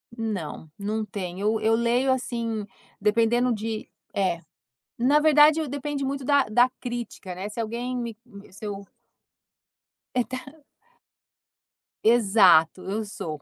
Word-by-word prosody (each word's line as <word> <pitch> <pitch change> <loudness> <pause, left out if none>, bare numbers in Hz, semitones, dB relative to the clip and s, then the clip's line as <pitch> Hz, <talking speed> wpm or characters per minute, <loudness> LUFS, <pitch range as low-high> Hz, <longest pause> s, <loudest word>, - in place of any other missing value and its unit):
Não, 200 -9 -4
não 215 +2 -2
tem 185 -3 -6
eu 215 +2 +1
eu 225 +1 +2
leio 240 +3 +2
assim, 230 -4 -2 0.4
dependendo 230 +4 +3
de 220 0 -4 0.2
eh, 185 -4 0 0.6
na 275 +5 +4
verdade 305 +1 +5
depende 285 +1 -3
muito 275 0 -3
da 285 -1 +4
da 240 +4 +4
crítica, 240 -6 -5
né, 190 +3 -5
se 215 - -6
alguém 240 +3 -3
me 235 -3 -4 0.3
se 200 +3 -12
eu 200 -1 -5 1.3
É 250 - +4
ta 255 - -2 0.2
o - - -27 1.4
Exato, 195 -7 +5
eu 210 +3 -2
sou, 160 -7 -6
225 Hz, 130 wpm, -25 LUFS, 200-250 Hz, 1.4 s, verdade